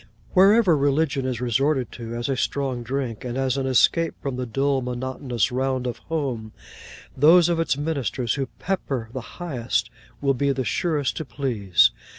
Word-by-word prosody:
Wherever 195 -1 +6
religion 140 -1 +1
is 125 -3 -2
resorted 130 +2 +1
to, 115 -1 -7
as 120 0 -3
a 135 - 0
strong 130 -1 -1
drink, 125 -2 -3
and 125 0 -4
as 135 -1 +1
an 135 -1 -1
escape 165 +6 +3
from 135 -2 -4
the 125 0 -3
dull 135 +3 +1
monotonous 125 -1 -2
round 130 0 -1
of 120 -2 -3
home, 130 -9 -3 0.6
those 165 +5 +6
of 170 -1 +1
its 165 -4 +1
ministers 140 -6 -1
who 135 -2 -2
pepper 135 -11 -3
the 130 - -4 0.2
highest 125 -8 -2 0.3
will 140 -1 +2
be 140 +2 +1
the 130 -2 -2
surest 145 - 0
to 160 - -3
please. 115 -9 +2
135 Hz, 165 wpm, -24 LUFS, 125-145 Hz, 0.6 s, Wherever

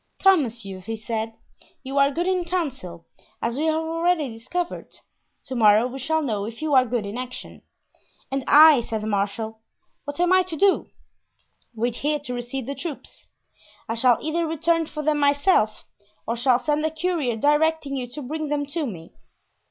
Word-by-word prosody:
"Come, 385 -4 +5
monsieur," 220 -7 -5
he 225 +5 -5
said, 220 0 -4 0.5
"you 270 +1 -1
are 280 0 +5
good 335 +5 -2
in 370 -1 +1
council, 265 - -4 0.3
as 235 +1 -2
we 300 +4 -1
have 315 -1 +2
already 325 -1 0
discovered; 255 +11 -5 0.5
to 265 - -6
morrow 215 -1 +5
we 255 +2 -5
shall 315 +4 0
know 210 -7 -2
if 230 +1 -8
you 310 -2 -1
are 260 -1 +6
good 235 -3 -1
in 205 +5 -5
action." 250 0 -8 0.7
"And 270 0 -1
I," 300 -3 +8
said 220 -2 -3
the - - -5
marshal, 215 +2 -2 0.5
"what 285 +2 -6
am 355 +1 +3
I 370 - +6
to 360 -3 -4
do?" 395 +2 +3 0.9
"Wait 235 +1 -1
here 300 +1 0
to 285 -4 -7
receive 245 +1 -4
the 280 - -4
troops. 300 0 -8 0.6
I - - -2
shall 235 0 +4
either 325 +2 -1
return 325 +1 +1
for 300 0 -6
them 300 0 +1
myself 285 - +2 0.4
or 230 - -1
shall 245 +1 +3
send 300 +3 -1
a 315 - +2
courier 315 -6 -1
directing 295 +3 +1
you 255 -2 -3
to 280 +4 -8
bring 310 +4 -4
them 290 0 -1
to 320 -4 -1
me. 165 -7 -9
275 Hz, 185 wpm, -24 LUFS, 230-315 Hz, 0.9 s, I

